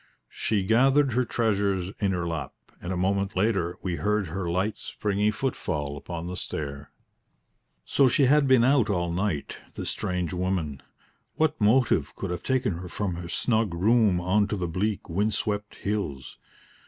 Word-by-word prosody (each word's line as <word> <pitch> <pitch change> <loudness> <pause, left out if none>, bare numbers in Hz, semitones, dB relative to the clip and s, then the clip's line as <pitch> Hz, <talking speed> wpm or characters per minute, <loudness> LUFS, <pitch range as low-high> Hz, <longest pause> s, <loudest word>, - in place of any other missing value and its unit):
She 105 -3 0
gathered 135 +6 +4
her 125 +2 +2
treasures 100 -5 0
in 100 -2 +1
her 90 -2 -1
lap, 80 -5 -4 0.3
and 90 - -4
a 95 - -1
moment 100 +2 0
later 95 -3 +1
we 90 -3 -2
heard 105 -3 0
her 90 +1 -3
light, 95 +5 -1
springy 105 0 -1
footfall 80 - -2
upon 85 +3 -6
the 90 +1 -4
stair. 70 -4 -5 1.0
So 140 - +4
she 135 +3 +3
had 140 +2 +4
been 130 -3 +5
out 125 -3 +4
all 85 -3 0
night, 90 -4 -2 0.2
this - - -2
strange 90 -3 -2
woman. 90 -6 -2 0.5
What 155 -4 +1
motive 105 - +3
could 95 - -4
have 90 - -3
taken 125 -10 0
her 90 0 -7
from 95 +1 -2
her 85 0 -7
snug 110 -5 +1
room 105 0 +3
on 95 +4 +2
to 105 - -2
the 90 -2 -2
bleak, 95 +5 -2
wind 100 +5 0
swept 105 -1 -3
hills? 100 -10 -4
100 Hz, 165 wpm, -26 LUFS, 85-110 Hz, 1.0 s, been